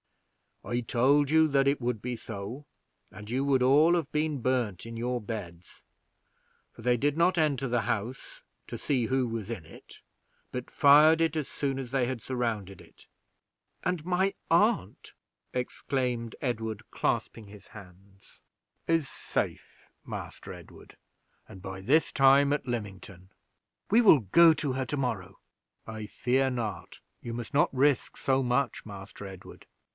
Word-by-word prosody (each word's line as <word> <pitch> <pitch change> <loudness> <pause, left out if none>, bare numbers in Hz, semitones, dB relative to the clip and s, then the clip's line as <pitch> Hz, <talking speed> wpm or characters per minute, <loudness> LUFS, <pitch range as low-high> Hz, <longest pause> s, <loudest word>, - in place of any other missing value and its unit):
"I 120 0 -2
told 135 +5 +2
you 160 +1 +5
that 140 -1 +2
it 140 +1 +2
would 120 -3 -2
be 125 +1 -3
so, 110 +5 -7 0.5
and 105 0 -11
you 130 +3 0
would 135 -2 +2
all 145 +6 +5
have 160 -4 -2
been 150 -3 -1
burned 115 -7 -1
in 115 0 -8
your 125 +1 -1
beds, 95 -6 -8 0.9
for - - -14
they 125 0 +3
did 145 +4 0
not 175 +2 +3
enter 140 -4 +1
the 120 -1 +1
house 110 +4 -4 0.3
to - - -6
see 130 -5 0
who 130 +1 0
was 115 -2 -5
in 105 -9 -5
it, - - -15 0.5
but 125 0 -5
fired 150 +3 +6
it 165 -1 +1
as 155 -3 -2
soon 135 -2 -3
as 130 -3 -6
they 130 -2 +1
had 130 -3 -4
surrounded 110 -7 -3
it." - - -18 0.8
"And 180 -4 -1
my 185 +2 +1 0.2
aunt!" 170 - +1 0.4
exclaimed 125 -2 -2
Edward, 110 -5 -3
clasping 110 -3 -2
his 100 0 -14
hands. 95 0 -15 0.5
"Is 165 -4 +1
safe, - - -4 0.2
Master - - -7
Edward, - - -14 0.5
and 95 - -12
by 95 0 -7
this 145 +11 +2
time 140 +1 +5
at 145 - -3
Lymington." 100 -5 -6 0.6
"We 225 +4 +5
will 195 - +7
go 160 - +6
to 140 -4 -2
her 130 0 -2
to 145 - -3
morrow." 100 -9 -3 0.5
"I 110 -1 -6
fear 130 +5 +1
not; 115 -7 -5 0.2
you 120 - -6
must 120 +4 -6
not 145 0 +3
risk 135 0 +1
so 135 0 +1
much, 125 +1 0
Master 100 -1 -9
Edward. 95 -1 -12
125 Hz, 155 wpm, -28 LUFS, 110-145 Hz, 0.9 s, will